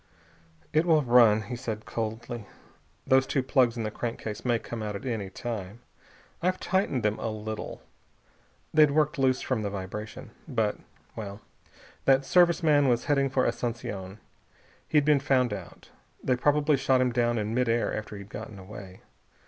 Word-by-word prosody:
"It 155 Hz, +3 st, +3 dB
will 155 Hz, -3 st, +5 dB
run," 120 Hz, -4 st, +5 dB
he 125 Hz, -, -5 dB
said 115 Hz, -4 st, -5 dB
coldly. 115 Hz, 0 st, -4 dB, 0.6 s
"Those 130 Hz, 0 st, +4 dB
two 135 Hz, -, 0 dB
plugs 125 Hz, -3 st, +2 dB
in 115 Hz, -, -2 dB
the 110 Hz, -, -3 dB
crankcase 115 Hz, -2 st, -5 dB
may 120 Hz, -2 st, +2 dB
come 115 Hz, +1 st, -6 dB
out 105 Hz, -1 st, -3 dB
at 100 Hz, -, -7 dB
any 110 Hz, -6 st, -2 dB
time. 110 Hz, 0 st, -6 dB, 0.6 s
I've 185 Hz, +2 st, +1 dB
tightened 185 Hz, -, 0 dB
them 105 Hz, 0 st, 0 dB
a 115 Hz, -, -2 dB
little. 110 Hz, 0 st, -6 dB, 0.9 s
They'd 155 Hz, -1 st, +6 dB
worked 150 Hz, +1 st, +1 dB
loose 130 Hz, -1 st, +2 dB
from 130 Hz, -4 st, -1 dB
the 105 Hz, -, -2 dB
vibration. 100 Hz, +2 st, -6 dB, 0.2 s
But -, -, 0 dB, 0.4 s
well.... 100 Hz, -2 st, -6 dB, 0.7 s
That 135 Hz, 0 st, +4 dB
Service 175 Hz, +2 st, +4 dB
man 145 Hz, -3 st, +4 dB
was 120 Hz, -1 st, +1 dB
heading 140 Hz, -2 st, +2 dB
for 130 Hz, -1 st, +1 dB
Asunción. 115 Hz, -5 st, -3 dB, 0.7 s
He'd 150 Hz, -2 st, +3 dB
been 150 Hz, -2 st, +5 dB
found 130 Hz, -4 st, +2 dB
out. 95 Hz, -4 st, -9 dB, 0.3 s
They 130 Hz, -, +2 dB
probably 145 Hz, +3 st, +3 dB
shot 135 Hz, -1 st, +3 dB
him 125 Hz, -1 st, +2 dB
down 120 Hz, -1 st, +1 dB
in 105 Hz, 0 st, -2 dB
mid 125 Hz, 0 st, +1 dB
air 115 Hz, +1 st, +1 dB
after 105 Hz, -1 st, -6 dB
he'd 100 Hz, 0 st, -10 dB
gotten 110 Hz, -1 st, -8 dB
away. 95 Hz, -1 st, -10 dB
120 Hz, 165 wpm, -28 LUFS, 110-135 Hz, 0.9 s, They'd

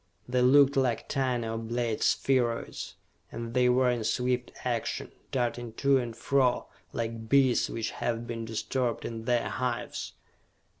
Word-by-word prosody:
They 125 Hz, 0 st, +1 dB
looked 140 Hz, +2 st, +6 dB
like 130 Hz, -4 st, +1 dB
tiny 130 Hz, -4 st, 0 dB
oblate 115 Hz, 0 st, -2 dB
spheroids, 120 Hz, -3 st, 0 dB, 0.4 s
and 115 Hz, 0 st, -5 dB
they 125 Hz, -1 st, +4 dB
were 125 Hz, 0 st, +4 dB
in 120 Hz, -2 st, -1 dB
swift 125 Hz, +2 st, 0 dB
action, 120 Hz, -3 st, -2 dB, 0.2 s
darting 120 Hz, -2 st, -1 dB
to 135 Hz, +3 st, +3 dB
and 120 Hz, -2 st, -4 dB
fro 130 Hz, -2 st, +2 dB, 0.3 s
like 115 Hz, -1 st, -4 dB
bees 135 Hz, -2 st, +4 dB
which 115 Hz, -1 st, -3 dB
have 120 Hz, 0 st, -2 dB
been 115 Hz, -1 st, -4 dB
disturbed 115 Hz, +2 st, -2 dB
in 115 Hz, -1 st, -5 dB
their 120 Hz, -1 st, +1 dB
hives. 125 Hz, -2 st, -3 dB
120 Hz, 140 wpm, -29 LUFS, 115-130 Hz, 0.4 s, looked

